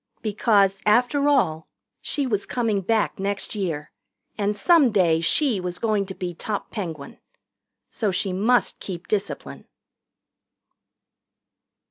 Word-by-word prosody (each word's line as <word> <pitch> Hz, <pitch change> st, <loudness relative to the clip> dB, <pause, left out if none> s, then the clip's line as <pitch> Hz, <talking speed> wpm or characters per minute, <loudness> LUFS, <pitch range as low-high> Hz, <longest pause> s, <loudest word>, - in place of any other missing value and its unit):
Because, 205 Hz, -2 st, +2 dB
after 250 Hz, +7 st, +3 dB
all, 160 Hz, -, +1 dB, 0.3 s
she 285 Hz, -, -1 dB
was 210 Hz, -6 st, -1 dB
coming 225 Hz, -5 st, 0 dB
back 220 Hz, +2 st, 0 dB
next 200 Hz, 0 st, -2 dB
year, 170 Hz, -8 st, -3 dB, 0.4 s
and 205 Hz, 0 st, -1 dB
some 310 Hz, -, +5 dB
day 170 Hz, -6 st, +3 dB
she 240 Hz, -, +2 dB
was 180 Hz, -1 st, -4 dB
going 210 Hz, -2 st, 0 dB
to 190 Hz, -, -7 dB
be 180 Hz, -1 st, -4 dB
top 205 Hz, +4 st, -4 dB
Penguin. 165 Hz, -9 st, -6 dB, 0.7 s
So 215 Hz, -4 st, -1 dB
she 190 Hz, 0 st, -1 dB
must 225 Hz, +6 st, +1 dB
keep 180 Hz, -2 st, -7 dB
discipline. 205 Hz, -2 st, -4 dB
205 Hz, 120 wpm, -24 LUFS, 185-230 Hz, 0.7 s, some